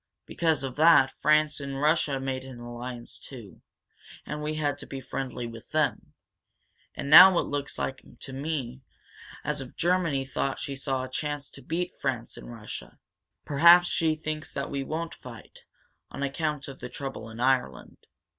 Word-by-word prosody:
Because 160 Hz, -4 st, 0 dB
of 130 Hz, -1 st, -5 dB
that 155 Hz, -4 st, +6 dB
France 155 Hz, 0 st, +3 dB
and 140 Hz, -1 st, -5 dB
Russia 150 Hz, -2 st, +2 dB
made 130 Hz, -1 st, -3 dB
an 130 Hz, -2 st, -10 dB
alliance, 120 Hz, 0 st, -7 dB
too, 115 Hz, -8 st, -11 dB, 0.6 s
and 150 Hz, 0 st, -5 dB
we 155 Hz, +1 st, -2 dB
had 145 Hz, -2 st, -1 dB
to -, -, -9 dB
be 135 Hz, -, -6 dB
friendly 130 Hz, -2 st, -5 dB
with 115 Hz, -1 st, -10 dB
them. 155 Hz, -1 st, -1 dB, 0.8 s
And -, -, -5 dB
now 180 Hz, +5 st, +10 dB
it -, -, +3 dB
looks 145 Hz, -1 st, -4 dB
to 135 Hz, 0 st, -6 dB
me 135 Hz, -3 st, -4 dB, 0.6 s
as 150 Hz, -1 st, -2 dB
if 130 Hz, -, -10 dB
Germany 170 Hz, -6 st, +1 dB
thought 135 Hz, +1 st, -2 dB
she 140 Hz, -, -4 dB
saw 135 Hz, -1 st, -2 dB
a -, -, -4 dB
chance 145 Hz, +2 st, -4 dB
to 140 Hz, -, -11 dB
beat 170 Hz, +7 st, -2 dB
France 125 Hz, -4 st, -2 dB
and -, -, -10 dB
Russia. -, -, -9 dB, 0.5 s
Perhaps 170 Hz, +5 st, +7 dB
she 160 Hz, -1 st, +1 dB
thinks 155 Hz, 0 st, -5 dB
that 140 Hz, -, -4 dB
we 140 Hz, -1 st, -2 dB
won't 160 Hz, +4 st, -4 dB
fight, 115 Hz, -3 st, -13 dB, 0.4 s
on 140 Hz, -, -5 dB
account 150 Hz, +1 st, -2 dB
of 135 Hz, -1 st, -9 dB
the 125 Hz, -, -7 dB
trouble 135 Hz, -4 st, -6 dB
in 110 Hz, +1 st, -10 dB
Ireland. 125 Hz, -, -1 dB
140 Hz, 165 wpm, -27 LUFS, 130-155 Hz, 0.8 s, now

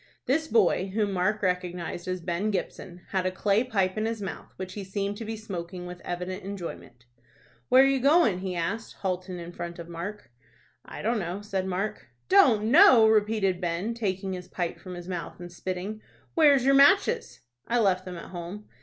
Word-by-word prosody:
This 315 Hz, +4 st, +1 dB
boy, 195 Hz, -, +3 dB
whom 210 Hz, -2 st, +1 dB
Mark 200 Hz, +4 st, 0 dB
recognized 180 Hz, -1 st, -2 dB
as 185 Hz, -1 st, -2 dB
Ben 175 Hz, +4 st, -1 dB
Gibson, 180 Hz, -2 st, -4 dB
had 185 Hz, -1 st, 0 dB
a -, -, 0 dB
clay 200 Hz, +4 st, +2 dB
pipe 195 Hz, -5 st, 0 dB
in 220 Hz, -, 0 dB
his 225 Hz, -1 st, -3 dB
mouth, 195 Hz, -2 st, -7 dB
which 185 Hz, 0 st, -6 dB
he 205 Hz, -, -5 dB
seemed 200 Hz, +1 st, -3 dB
to 225 Hz, -, -6 dB
be 220 Hz, +1 st, -4 dB
smoking 180 Hz, -4 st, -6 dB
with 180 Hz, 0 st, -8 dB
evident 180 Hz, +2 st, -4 dB
enjoyment. 170 Hz, -11 st, -8 dB, 0.6 s
"Where 260 Hz, +1 st, +7 dB
you 270 Hz, 0 st, +2 dB
goin'?" 280 Hz, -, +4 dB
he 185 Hz, -1 st, -4 dB
asked, 195 Hz, +7 st, -3 dB
halting 185 Hz, -1 st, -3 dB
in 170 Hz, 0 st, -7 dB
front 170 Hz, 0 st, -6 dB
of 170 Hz, -1 st, -8 dB
Mark. 175 Hz, -, -7 dB, 0.5 s
"I -, -, -9 dB
don't 230 Hz, +1 st, +1 dB
know," 185 Hz, +2 st, -4 dB
said 195 Hz, -2 st, -2 dB
Mark. 190 Hz, +3 st, -3 dB, 0.2 s
"Don't 235 Hz, -, +5 dB
know!" 265 Hz, -, +8 dB
repeated 210 Hz, -4 st, +2 dB
Ben, 175 Hz, +6 st, -1 dB
taking 195 Hz, -4 st, -2 dB
his 180 Hz, -1 st, -7 dB
pipe 175 Hz, -2 st, -3 dB
from 185 Hz, -2 st, -8 dB
his 175 Hz, 0 st, -9 dB
mouth, 180 Hz, -2 st, -5 dB
and 175 Hz, 0 st, -8 dB
spitting. 185 Hz, +4 st, -5 dB, 0.3 s
"Where's 285 Hz, -6 st, +5 dB
your 275 Hz, -, +5 dB
matches?" 395 Hz, -, +4 dB, 0.3 s
"I 240 Hz, -, +1 dB
left 190 Hz, -5 st, +2 dB
them 180 Hz, -1 st, -7 dB
at -, -, -10 dB
home." 180 Hz, +4 st, -7 dB
190 Hz, 190 wpm, -27 LUFS, 180-220 Hz, 0.6 s, know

